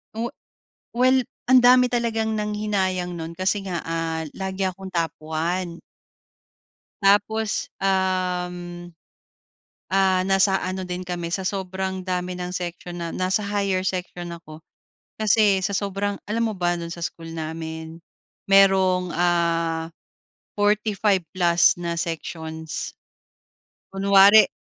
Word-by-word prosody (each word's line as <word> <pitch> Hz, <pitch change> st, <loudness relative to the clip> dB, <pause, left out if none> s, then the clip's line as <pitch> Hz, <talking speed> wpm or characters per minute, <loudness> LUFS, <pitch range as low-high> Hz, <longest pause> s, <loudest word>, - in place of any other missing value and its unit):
Oh, 230 Hz, +3 st, -3 dB, 0.6 s
well 255 Hz, +1 st, +3 dB, 0.2 s
ang 255 Hz, -1 st, +6 dB
dami 250 Hz, 0 st, +7 dB
talagang 225 Hz, -2 st, 0 dB
nanghinayang 200 Hz, -4 st, -1 dB
no'n 165 Hz, 0 st, -6 dB
kasi 190 Hz, +3 st, -1 dB
nga, 180 Hz, -3 st, -3 dB
ah, 165 Hz, -1 st, -2 dB, 0.2 s
lagi 190 Hz, 0 st, -2 dB
akong 190 Hz, +1 st, -8 dB
top 165 Hz, -3 st, -1 dB
1. 170 Hz, +2 st, -2 dB, 1.2 s
Tapos, 210 Hz, +2 st, +2 dB
um, 180 Hz, -2 st, -1 dB, 1.0 s
ah, 190 Hz, 0 st, +3 dB
nasa 195 Hz, 0 st, +3 dB
ano 185 Hz, 0 st, -3 dB
din 180 Hz, 0 st, -4 dB
kami 175 Hz, -1 st, -4 dB
sa 190 Hz, -, 0 dB
sobrang 190 Hz, -1 st, -3 dB
dami 180 Hz, -1 st, -2 dB
ng 180 Hz, 0 st, -5 dB
section 175 Hz, -1 st, -5 dB
na 170 Hz, -, -3 dB
nasa 185 Hz, +2 st, +1 dB
higher 200 Hz, -2 st, 0 dB
section 180 Hz, -2 st, -4 dB
ako 160 Hz, -2 st, -12 dB, 0.6 s
kasi 210 Hz, -2 st, +3 dB
sa 200 Hz, -, 0 dB
sobrang 200 Hz, 0 st, -2 dB
alam 225 Hz, +3 st, 0 dB
mo -, -, -7 dB
ba 175 Hz, -1 st, +1 dB
do'n 170 Hz, -1 st, -5 dB
sa 170 Hz, -, -7 dB
school 165 Hz, 0 st, -7 dB
namin, 160 Hz, 0 st, -6 dB, 0.5 s
mayrong, 190 Hz, -2 st, +4 dB
ah, 170 Hz, -2 st, +1 dB, 0.7 s
45+ 195 Hz, -4 st, +2 dB
na 170 Hz, -1 st, -2 dB
sections. 160 Hz, -1 st, -5 dB, 1.0 s
Kunwari 200 Hz, +2 st, +7 dB
185 Hz, 115 wpm, -23 LUFS, 170-200 Hz, 1.2 s, dami